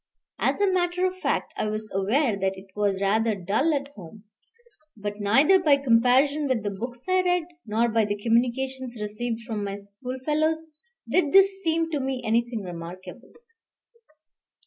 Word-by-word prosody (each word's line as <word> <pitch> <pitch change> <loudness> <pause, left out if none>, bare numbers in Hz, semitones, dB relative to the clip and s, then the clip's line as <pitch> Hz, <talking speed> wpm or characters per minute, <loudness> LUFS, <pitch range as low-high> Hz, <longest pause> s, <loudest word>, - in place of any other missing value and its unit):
As - - +1
a 405 - +4
matter 360 0 +1
of 370 0 -2
fact, - - -1
I - - -2
was 215 0 -3
aware 215 +6 +1
that 195 -1 -2
it 190 0 -13
was 205 -2 0
rather 220 +2 +2
dull 205 - 0
at 280 0 -3
home; 205 - -13 0.7
but 205 0 -5
neither 270 - +4
by 300 -6 +4
comparison 270 +3 +3
with 250 -6 0
the 205 - -2
books 240 +5 -6
I 370 0 +3
read, 360 -1 +1 0.2
nor 225 +3 +2
by 225 -1 +2
the 205 0 -2
communications 245 +2 -1
received 225 +2 -3
from 220 -3 -4
my 200 -1 -3
school 205 +6 -7
fellows, 315 +1 +1 0.4
did 330 -6 +1
this 390 0 +5
seem 330 -2 0
to 300 - -1
me 265 -1 -3
anything 230 0 0
remarkable. 175 +1 -9
235 Hz, 165 wpm, -25 LUFS, 205-295 Hz, 0.7 s, this